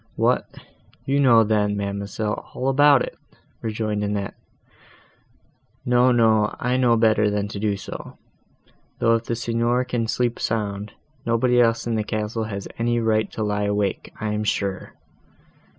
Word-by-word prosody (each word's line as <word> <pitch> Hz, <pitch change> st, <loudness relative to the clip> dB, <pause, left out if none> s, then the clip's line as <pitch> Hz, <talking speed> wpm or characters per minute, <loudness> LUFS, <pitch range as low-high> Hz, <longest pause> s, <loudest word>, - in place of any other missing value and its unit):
"What, -, -, 0 dB, 0.5 s
you 140 Hz, +1 st, +1 dB
know 120 Hz, -5 st, +6 dB
then, 105 Hz, -1 st, +1 dB
ma'amselle, 100 Hz, +1 st, -3 dB
all 130 Hz, +1 st, 0 dB
about 140 Hz, 0 st, +5 dB
it!" -, -, -6 dB, 0.5 s
rejoined 110 Hz, -2 st, -2 dB
Annette. 100 Hz, -1 st, -2 dB, 1.5 s
"No, 125 Hz, +1 st, +4 dB
no, 110 Hz, -3 st, +3 dB
I 125 Hz, -, -1 dB
do -, -, +1 dB
know 120 Hz, -2 st, +4 dB
better 110 Hz, -1 st, +3 dB
than 105 Hz, 0 st, -1 dB
to 100 Hz, -, -6 dB
do 105 Hz, -1 st, 0 dB
so; 95 Hz, -, -9 dB, 0.8 s
though, 115 Hz, -, +3 dB
if 115 Hz, 0 st, 0 dB
the 115 Hz, -, -2 dB
Signor 120 Hz, +2 st, 0 dB
can 120 Hz, -2 st, -2 dB
sleep 120 Hz, +1 st, -1 dB
sound, 105 Hz, -2 st, -2 dB, 0.3 s
nobody 120 Hz, +1 st, +3 dB
else 115 Hz, 0 st, +2 dB
in 120 Hz, -, -1 dB
the 110 Hz, -1 st, 0 dB
castle 110 Hz, +1 st, -3 dB
has 100 Hz, -2 st, -5 dB
any 120 Hz, 0 st, +1 dB
right 110 Hz, -2 st, +1 dB
to 110 Hz, -, -3 dB
lie 105 Hz, 0 st, -1 dB
awake, 100 Hz, -1 st, -1 dB
I 110 Hz, -, -2 dB
am 105 Hz, 0 st, -1 dB
sure." 100 Hz, -2 st, -2 dB
110 Hz, 155 wpm, -23 LUFS, 105-120 Hz, 1.5 s, know